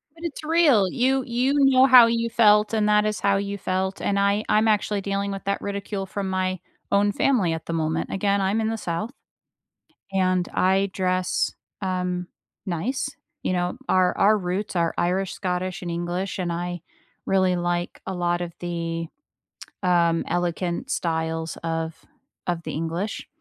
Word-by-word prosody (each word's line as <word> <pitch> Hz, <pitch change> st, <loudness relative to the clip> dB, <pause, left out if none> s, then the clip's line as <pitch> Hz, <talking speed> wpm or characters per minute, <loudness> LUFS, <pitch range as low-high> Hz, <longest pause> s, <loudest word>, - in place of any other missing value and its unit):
But 330 Hz, -, -14 dB
it's 310 Hz, -1 st, -5 dB
real, 305 Hz, -, +4 dB
you 260 Hz, +1 st, +2 dB
you 250 Hz, +3 st, +1 dB
know 270 Hz, -1 st, +6 dB
how 255 Hz, -3 st, +9 dB
you 230 Hz, 0 st, 0 dB
felt, 210 Hz, -1 st, +4 dB
and 215 Hz, -1 st, +2 dB
that 210 Hz, 0 st, +4 dB
is 215 Hz, 0 st, -1 dB
how 200 Hz, 0 st, +2 dB
you 200 Hz, 0 st, -3 dB
felt, 190 Hz, +1 st, -2 dB
and 200 Hz, 0 st, +1 dB
I 200 Hz, +2 st, +2 dB
I'm 215 Hz, +1 st, +3 dB
actually 210 Hz, -1 st, +1 dB
dealing 200 Hz, 0 st, -2 dB
with 195 Hz, -, -5 dB
that 200 Hz, -, -1 dB
ridicule 200 Hz, -1 st, -4 dB
from 195 Hz, 0 st, -4 dB
my 185 Hz, -1 st, -1 dB, 0.3 s
own 205 Hz, +1 st, +3 dB
family 200 Hz, -8 st, +2 dB
at 160 Hz, -, -5 dB
the 165 Hz, -, -4 dB
moment. 160 Hz, 0 st, -1 dB
Again, 200 Hz, 0 st, +1 dB
I'm 200 Hz, +4 st, +1 dB
in 220 Hz, -, 0 dB
the 225 Hz, -, -2 dB
South, 180 Hz, +5 st, -3 dB, 1.0 s
and 185 Hz, -2 st, +1 dB
I 190 Hz, +1 st, +2 dB
dress, 185 Hz, -1 st, 0 dB, 0.3 s
um, 180 Hz, -1 st, -2 dB, 0.4 s
nice. 235 Hz, +11 st, -2 dB, 0.3 s
You 185 Hz, -, 0 dB
know, 180 Hz, +5 st, -1 dB
our 185 Hz, -1 st, +3 dB
our 210 Hz, +2 st, +5 dB
roots 185 Hz, +2 st, -3 dB
are 170 Hz, -1 st, +1 dB
Irish, 185 Hz, +2 st, 0 dB
Scottish, 185 Hz, -1 st, -3 dB
and 175 Hz, -, -3 dB
English, 175 Hz, +3 st, -3 dB
and 175 Hz, -2 st, -1 dB
I 175 Hz, 0 st, -3 dB, 0.5 s
really 185 Hz, -1 st, +3 dB
like 175 Hz, 0 st, -2 dB
a 190 Hz, -, -2 dB
lot 175 Hz, 0 st, 0 dB
of 170 Hz, -1 st, -5 dB
the, 165 Hz, -1 st, -3 dB, 0.8 s
um, 170 Hz, -2 st, +3 dB
elegant 175 Hz, 0 st, -2 dB
styles 160 Hz, -1 st, -2 dB
of 165 Hz, -1 st, -3 dB, 0.4 s
of 170 Hz, -1 st, -1 dB
the -, -, -5 dB
English. 165 Hz, +6 st, -3 dB
190 Hz, 165 wpm, -24 LUFS, 175-210 Hz, 1.0 s, how